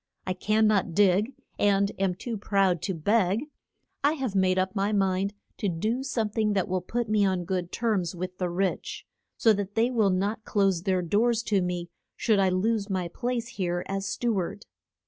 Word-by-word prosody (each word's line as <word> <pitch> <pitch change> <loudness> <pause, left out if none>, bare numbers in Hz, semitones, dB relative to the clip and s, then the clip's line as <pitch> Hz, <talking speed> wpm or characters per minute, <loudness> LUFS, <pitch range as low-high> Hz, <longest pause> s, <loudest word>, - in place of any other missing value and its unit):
I 185 - -1
can 215 +4 +2
not 200 -6 +2
dig, 205 +4 +4 0.3
and 200 0 +3
am 190 -2 +1
too 230 +5 -5
proud 195 -4 +1
to 190 - -2
beg. 200 - +1 0.6
I 290 +2 +4
have 265 -9 -3
made 190 -1 +2
up 185 +1 0
my 200 +1 +1
mind 195 0 +1 0.2
to 205 - -1
do 215 +9 -1
some 250 -5 -1
thing 215 -1 +1
that 190 -3 0
will 185 0 -1
put 235 +6 -2
me 210 -1 +2
on 185 -3 +1
good 180 -1 -2
terms 200 -7 0
with 180 +1 -6
the 180 -1 0
rich, 185 +2 -2 0.3
so 225 - +5
that 205 0 -4
they 230 +3 +2
will 220 -5 +3
not 200 +4 -1
close 195 -5 +1
their 185 0 0
doors 225 +6 +2
to 205 -4 +1
me 175 -1 -3 0.2
should 220 -3 +2
I 190 -1 +4
lose 205 +3 0
my 185 -3 -1
place 240 +4 -2
here 175 -4 -2
as 195 0 -2
stew 235 +1 -1
ard. 195 +4 -5
195 Hz, 195 wpm, -27 LUFS, 185-220 Hz, 0.6 s, so